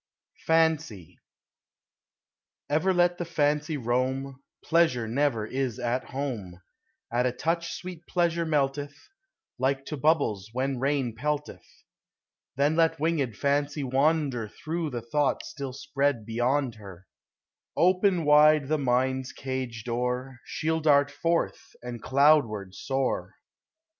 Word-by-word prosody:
FANCY. 160 Hz, -, +1 dB, 1.5 s
Ever 160 Hz, +6 st, +2 dB
let 175 Hz, -1 st, +2 dB
the -, -, -1 dB
Fancy 150 Hz, -1 st, 0 dB
roam, 130 Hz, +2 st, -1 dB, 0.2 s
Pleasure 160 Hz, -9 st, +2 dB
never 120 Hz, -2 st, 0 dB
is 130 Hz, -1 st, -2 dB
at 125 Hz, +1 st, -1 dB
home: 120 Hz, -10 st, -5 dB, 0.5 s
At 125 Hz, +1 st, +2 dB
a -, -, 0 dB
touch 165 Hz, +6 st, -2 dB
sweet 180 Hz, -2 st, -8 dB
Pleasure 170 Hz, -1 st, +1 dB
melteth, 145 Hz, -2 st, -1 dB, 0.6 s
Like 135 Hz, +1 st, 0 dB
to 150 Hz, -, -5 dB
hubbies 140 Hz, -, +1 dB
when 130 Hz, +1 st, -1 dB
rain 135 Hz, -3 st, 0 dB
pelteth; 150 Hz, +4 st, -3 dB, 0.9 s
Then 145 Hz, +3 st, +2 dB
let 165 Hz, -2 st, +2 dB
winged 145 Hz, -8 st, 0 dB
Fancy 145 Hz, +1 st, 0 dB
wander 135 Hz, -3 st, +1 dB
Through 160 Hz, +6 st, -4 dB
the 120 Hz, -4 st, -5 dB
thought 145 Hz, +4 st, 0 dB
still 140 Hz, -3 st, -6 dB
spread 135 Hz, -2 st, -1 dB
beyond 120 Hz, +3 st, 0 dB
her: 95 Hz, -3 st, -12 dB, 0.7 s
Open 185 Hz, -1 st, +3 dB
wide 150 Hz, -1 st, +5 dB
the 155 Hz, 0 st, +1 dB
mind's 130 Hz, 0 st, 0 dB
cage 130 Hz, -4 st, -5 dB
door, 125 Hz, +2 st, -3 dB
She -, -, -6 dB
'11 160 Hz, 0 st, +1 dB
dart 145 Hz, -2 st, +4 dB
forth, 165 Hz, +4 st, -2 dB
and 120 Hz, -2 st, -6 dB
cloud 140 Hz, 0 st, +5 dB
ward 100 Hz, -3 st, -7 dB
soar. 135 Hz, +4 st, -2 dB
140 Hz, 125 wpm, -27 LUFS, 125-155 Hz, 1.5 s, wide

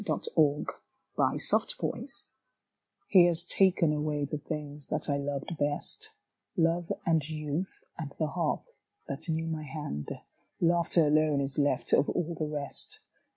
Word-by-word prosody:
Vigils -, -, -1 dB, 0.9 s
THE -, -, +3 dB, 0.3 s
GIFT -, -, -6 dB, 0.8 s
He 185 Hz, +1 st, +7 dB
has 170 Hz, 0 st, +1 dB
taken 180 Hz, -5 st, +4 dB
away 150 Hz, -1 st, 0 dB
the 145 Hz, +1 st, -4 dB
things 150 Hz, -2 st, -6 dB
that 150 Hz, -, -2 dB
I 140 Hz, -2 st, +1 dB
loved 140 Hz, +3 st, -3 dB
best 145 Hz, 0 st, -2 dB, 0.5 s
Love 165 Hz, 0 st, +2 dB
and 165 Hz, -4 st, +3 dB
youth 155 Hz, +3 st, -3 dB, 0.2 s
and 150 Hz, -4 st, -4 dB
the 160 Hz, -, +1 dB
harp 165 Hz, -1 st, -1 dB, 0.4 s
that -, -, -5 dB
knew 160 Hz, 0 st, 0 dB
my 160 Hz, -1 st, -2 dB
hand. 145 Hz, -, -5 dB, 0.5 s
Laughter 170 Hz, -1 st, +4 dB
alone 150 Hz, -1 st, +3 dB
Is 135 Hz, 0 st, 0 dB
left 140 Hz, -3 st, +2 dB
of 140 Hz, -, +5 dB
all 170 Hz, 0 st, -1 dB
the 155 Hz, -2 st, -2 dB
rest. 145 Hz, -2 st, -4 dB
155 Hz, 140 wpm, -30 LUFS, 145-165 Hz, 0.9 s, He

